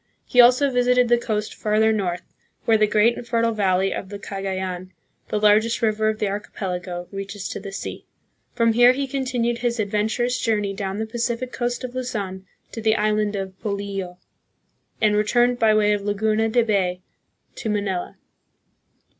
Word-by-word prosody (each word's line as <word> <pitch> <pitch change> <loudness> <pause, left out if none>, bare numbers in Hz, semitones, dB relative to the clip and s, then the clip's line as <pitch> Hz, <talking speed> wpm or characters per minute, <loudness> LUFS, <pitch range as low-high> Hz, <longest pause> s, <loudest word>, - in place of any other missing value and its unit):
He 250 - +6
also 255 +3 +5
visited 250 -1 +3
the 240 - +5
coast 215 -3 -2
farther 220 +1 +2
north, 180 -4 -2 0.4
where 225 - +4
the 215 -1 +4
great 215 +3 +3
and 235 - -10
fertile 230 -1 +1
valley 195 -3 +1
of 190 - -6
the 205 - -6
Cagayan, 190 -2 -4 0.4
the 210 - -1
largest 215 +3 +3
river 215 0 +2
of 215 - -2
the 210 - -1
archipelago, 180 -3 -4
reaches 195 0 -5
to - - -5
the 195 0 -8
sea. 195 - -7 0.5
From 230 -1 +3
here 245 +2 +6
he 275 +1 -2
continued 250 -3 -1
his 240 -1 -1
adventurous 215 +4 0
journey 210 -4 0
down 195 0 -4
the 220 - -2
Pacific 235 +2 -3
coast 245 0 -2
of 250 -1 -5
Luzon 200 -7 -4 0.2
to 225 - -6
the 220 0 +3
island 210 -1 +1
of 190 -1 -5
Polillo, 200 -4 -4 0.8
and 210 -2 +3
returned 240 +4 +2
by 225 -1 +4
way 210 -1 +3
of 205 - -1
Laguna 215 +2 0
de 240 +2 +3
Bay 185 -5 0 0.5
to 225 - -5
Manila. 200 -4 -2
215 Hz, 170 wpm, -23 LUFS, 200-235 Hz, 0.8 s, He